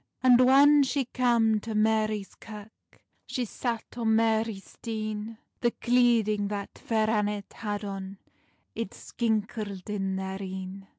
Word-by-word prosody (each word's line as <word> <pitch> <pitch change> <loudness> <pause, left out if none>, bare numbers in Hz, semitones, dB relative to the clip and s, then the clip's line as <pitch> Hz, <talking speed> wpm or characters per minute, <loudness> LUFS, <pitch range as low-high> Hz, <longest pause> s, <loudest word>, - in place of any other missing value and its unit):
And 250 -1 +7
whan 280 +3 +7
she 275 0 +1
cam 235 -3 +2
to 220 +1 -5
Marie's 215 -1 +1
Kirk, 215 -1 -13 0.2
She 250 - -2
sat 230 0 -3
on 225 -2 +2
Marie's 220 -2 0
stean: 215 -1 -5 0.2
The 240 - +2
cleading 235 -4 +2
that 200 -1 -5
Fair 220 -2 0
Annet 210 -2 -1
had 205 -1 -4
on 195 0 -6 0.6
It 230 -4 -5
skinkled 210 -4 -3
in 195 -2 -1
their 190 +1 -4
een. 190 0 -7
215 Hz, 130 wpm, -28 LUFS, 205-230 Hz, 0.6 s, And